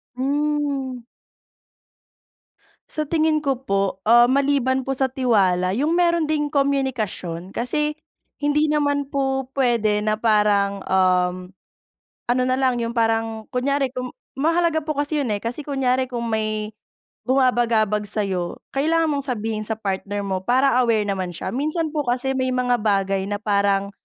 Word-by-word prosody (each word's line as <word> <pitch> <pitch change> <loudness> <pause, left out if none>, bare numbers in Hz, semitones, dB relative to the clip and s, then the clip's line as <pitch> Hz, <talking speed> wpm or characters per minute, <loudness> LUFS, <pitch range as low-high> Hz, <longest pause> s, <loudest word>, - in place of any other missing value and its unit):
Hmm. 280 -2 -1 1.9
Sa 305 0 -2
tingin 310 0 +1
ko 270 -2 -1
po, 195 -4 -1
ah, 240 +1 +7
maliban 265 0 +2
po 270 +1 -2
sa 265 0 +1
tiwala, 190 -8 +2
yung 300 +5 +1
meron 340 -2 +2
ding 295 -1 0
komunikasyon, 250 - -1
kasi 300 +5 0 0.5
hindi 295 +1 +2
naman 285 -2 +1
po 270 -1 0
pwede 230 -6 +1
na 215 0 0
parang, 205 -3 +2
um, 180 -1 +3 0.9
ano 250 +1 +2
na 255 0 +1
lang, 260 -2 +1
yung 230 +1 -3
parang 225 -1 0
kunyari, 270 +1 0
kung 250 0 -4 0.3
mahalaga 330 +2 +2
po 305 0 -3
kasi 290 +1 0
'yun, 260 - -2
eh, 205 - -6
kasi 240 +6 -3
kunyari 260 -2 0
kung 240 -2 -3
may 215 -1 -2 0.6
bumabagabag 240 -5 +2
sa'yo, 190 -4 -2 0.2
kailangan 325 +4 +2
mong 280 -2 -1
sabihin 220 -2 -2
sa 220 - -1
partner 205 0 -3
mo 190 -1 -2
para 255 +3 +3
aware 225 -3 +2
naman 190 -3 -2
siya. 185 - -4
Minsan 310 +4 -1
po 300 - +1
kasi 250 +2 0
may 260 0 0
mga 250 -1 +1
bagay 195 -2 +1
na 205 - -1
parang, 200 -1 +1
250 Hz, 145 wpm, -22 LUFS, 210-280 Hz, 1.9 s, ah